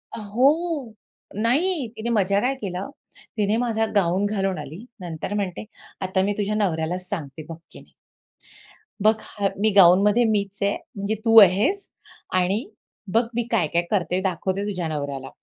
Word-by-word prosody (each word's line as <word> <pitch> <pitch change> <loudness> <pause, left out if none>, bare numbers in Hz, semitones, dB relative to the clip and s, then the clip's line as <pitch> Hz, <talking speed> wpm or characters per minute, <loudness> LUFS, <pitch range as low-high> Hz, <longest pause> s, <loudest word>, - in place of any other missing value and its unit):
अ, - - -5
हो. 270 +4 +1 0.4
नाही, 270 - +1
तिने 230 +2 -4
मजा 200 0 +2
काय 265 +2 +1
केला. 190 -5 -5 0.5
तिने 210 +1 +1
माझा 225 -2 0
गाऊन 190 +1 +2
घालून 195 -3 -1
आली. 155 - -9 0.2
नंतर 170 +2 -5
म्हणते, 200 0 -3 0.4
"आता 190 0 0
मी 205 +1 0
तुझ्या 210 +1 -1
नवऱ्यालाच 180 -2 -1
सांगते 155 -5 -5
बघ 165 - -7
की" - - -12 1.2
"बघ 215 +1 +5 0.2
ह 200 - +2
मी 220 - +4
गाउनमध्ये 200 +5 +6
मीच 200 -2 -1
आहे. 200 - +1 0.2
म्हणजे 200 +2 -2
तू 225 0 +5
आहेस 205 - +3 0.5
आणि 195 +7 0 0.5
बघ 230 +2 +4
मी" 240 - +1
"काय-काय 170 -5 +1
करते, 185 -2 0
दाखवते 190 +1 -2
तुझ्या 180 -4 -3
नवऱ्याला." 140 -3 -4
200 Hz, 150 wpm, -23 LUFS, 180-225 Hz, 1.2 s, गाउनमध्ये